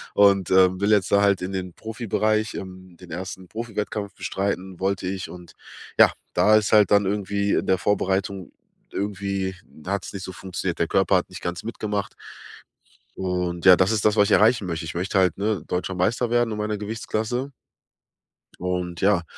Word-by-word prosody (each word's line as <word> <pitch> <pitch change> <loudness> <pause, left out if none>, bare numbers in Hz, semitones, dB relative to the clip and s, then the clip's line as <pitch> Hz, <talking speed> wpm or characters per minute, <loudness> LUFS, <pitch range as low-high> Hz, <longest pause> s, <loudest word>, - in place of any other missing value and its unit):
und, 100 -2 +4
ähm, 95 0 +4
will 100 - +2
jetzt 100 -3 +3
da 100 - +5
halt 100 -2 +3
in 90 - -3
den 95 -2 -4
Profibereich 110 -1 -1
ähm, 95 -2 -9
den 90 -3 -13
ersten 95 +1 -6
Profiwettkampf 105 -3 -4
bestreiten, 95 -2 -3
wollte 95 0 -1
ich. 95 -1 -4
Und 90 -1 -11 0.5
ja, - - +8 0.2
da 110 +1 +5
ist 105 - 0
halt 105 -1 +6
dann 100 -1 +5
irgendwie 100 0 -1
in - - 0
der 95 - +3
Vorbereitung 95 -1 -1 0.4
irgendwie 100 -1 -2 0.3
hat's 100 0 -3
nicht 95 -1 -6
so 95 - -6
funktioniert, 90 0 -4
der - - +1
Körper - - +3
hat - - -3
nicht - - -9
ganz 85 -1 -4
mitgemacht. 105 -3 -4 1.0
Und 90 -2 -2
ja, 90 -1 +10
das 95 +3 +2
ist 110 -3 0
das, 105 0 +4
was 105 -1 +4
ich - - -2
erreichen 110 -2 +3
möchte. 85 -1 -3
Ich 80 - -5
möchte 95 +3 0
halt, 90 -2 +2
ne, 100 -4 -1
deutscher 90 +1 -2
Meister 115 +7 0
werden 120 -1 +2
in 105 - -3
meiner 105 0 -2
Gewichtsklasse. 110 +5 -3 1.1
Und 90 -1 -3
ja, 95 -3 +3
100 Hz, 180 wpm, -24 LUFS, 90-105 Hz, 1.1 s, ja